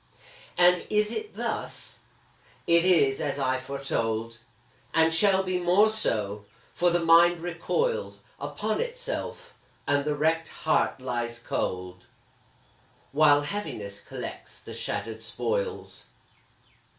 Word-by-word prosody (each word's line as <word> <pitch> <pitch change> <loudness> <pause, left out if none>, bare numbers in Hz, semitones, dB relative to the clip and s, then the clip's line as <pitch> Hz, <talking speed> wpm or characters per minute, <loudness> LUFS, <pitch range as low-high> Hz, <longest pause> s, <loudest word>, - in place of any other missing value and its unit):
And 180 0 +4
is 210 0 +2
it 430 - -5
thus? - - -5 0.7
it 170 0 +4
is 140 -7 +4
as 145 -2 -1
I 130 -1 +1
foretold, 115 -4 -3 0.6
And 160 0 +4
shall 190 +3 +4
be 185 -1 -1
more 185 +5 +4
so; 105 - -1 0.3
for 175 - +3
the 175 -1 +1
mind 170 +1 +6
recoils 460 - -2 0.2
Upon - - -2
itself, - - -5 0.3
and 145 0 +2
the 150 0 -1
wrecked 160 +2 +1 0.2
heart 155 - +2
lies 120 -2 -3
cold, 90 -4 -4 1.0
While 145 0 +5
Heaviness 125 - -5
collects - - -8
the - - -10
shattered 110 +2 -4
spoils. 485 - -3
160 Hz, 115 wpm, -27 LUFS, 130-190 Hz, 1.0 s, mind